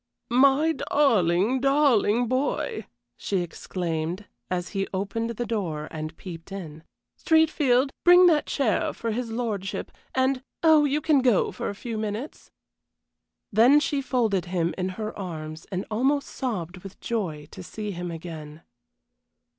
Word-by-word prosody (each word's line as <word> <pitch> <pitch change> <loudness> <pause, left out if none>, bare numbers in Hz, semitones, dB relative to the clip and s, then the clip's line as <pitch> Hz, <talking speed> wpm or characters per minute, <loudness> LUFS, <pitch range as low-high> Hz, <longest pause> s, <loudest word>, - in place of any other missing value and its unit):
"My 275 +5 +5
darling, 225 - +2
darling 255 -5 +3
boy!" 260 -2 -1 0.3
she 195 -3 -1
exclaimed, 175 +1 -4 0.2
as 180 0 -2
he 195 -1 -2
opened 200 +4 -2
the 235 +1 -3
door 175 -9 -3
and 155 0 -6
peeped 170 0 -9
in. 160 -5 -7 0.4
"Streatfield, 295 -5 +3
bring 355 +1 +8
that 320 -4 +4
chair 295 +4 0
for 230 - -3
his 235 +1 -3
lordship, 220 -5 -3 0.2
and 260 0 +2 0.2
oh, 315 -2 +6
you 290 +1 0
can 300 -2 +4
go 245 -6 +3
for - - -4
a 200 - -5
few 225 +1 -5
minutes." 215 +7 -5 1.0
Then 240 +8 +6
she 290 -1 -1
folded 225 -9 0
him 175 -2 -1
in 185 0 -2
her 215 -1 -4
arms, 160 -4 -7
and 185 +1 -2
almost 270 +6 +1
sobbed 185 - -4
with 195 +1 -11
joy 175 -11 -3
to 190 - -9
see 210 +3 -6
him 175 -1 -5
again. 160 -2 -8
215 Hz, 140 wpm, -26 LUFS, 180-265 Hz, 1.0 s, bring